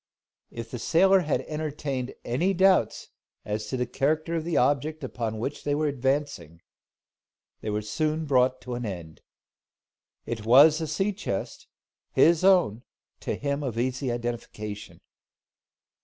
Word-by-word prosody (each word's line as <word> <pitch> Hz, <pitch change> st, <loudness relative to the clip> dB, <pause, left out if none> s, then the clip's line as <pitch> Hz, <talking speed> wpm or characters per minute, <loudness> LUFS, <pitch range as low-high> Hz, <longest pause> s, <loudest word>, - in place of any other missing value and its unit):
If 115 Hz, 0 st, -8 dB
the 125 Hz, -, -5 dB
sailor 190 Hz, +8 st, +4 dB
had 155 Hz, -5 st, 0 dB
entertained 145 Hz, -4 st, -4 dB
any 175 Hz, +11 st, +1 dB
doubts 185 Hz, -, +3 dB, 0.4 s
as 105 Hz, +1 st, -3 dB
to 130 Hz, -, -3 dB
the 125 Hz, -, 0 dB
character 155 Hz, +6 st, -1 dB
of 165 Hz, -2 st, -1 dB
the 170 Hz, 0 st, -1 dB
object 145 Hz, +4 st, +1 dB
upon 115 Hz, -4 st, -3 dB
which 135 Hz, +6 st, -4 dB
they 145 Hz, 0 st, 0 dB
were 155 Hz, +1 st, 0 dB
advancing, 135 Hz, -, -2 dB, 1.0 s
they 110 Hz, -, -5 dB
were 105 Hz, 0 st, -2 dB
soon 155 Hz, +9 st, -1 dB
brought 130 Hz, -2 st, +2 dB
to 125 Hz, 0 st, -6 dB
an 120 Hz, 0 st, -4 dB
end. 85 Hz, -7 st, -7 dB, 1.0 s
It 110 Hz, -2 st, -4 dB
was 145 Hz, +8 st, +6 dB
a 160 Hz, -, -2 dB
sea 195 Hz, +7 st, 0 dB
chest, 185 Hz, -, -5 dB, 0.5 s
his 170 Hz, +1 st, +4 dB
own, 180 Hz, -, +4 dB, 0.4 s
to -, -, -3 dB
him 140 Hz, +1 st, -2 dB
easy 125 Hz, +1 st, -2 dB
of 120 Hz, -, 0 dB
identification. 110 Hz, -3 st, -6 dB
135 Hz, 140 wpm, -26 LUFS, 115-155 Hz, 1.0 s, was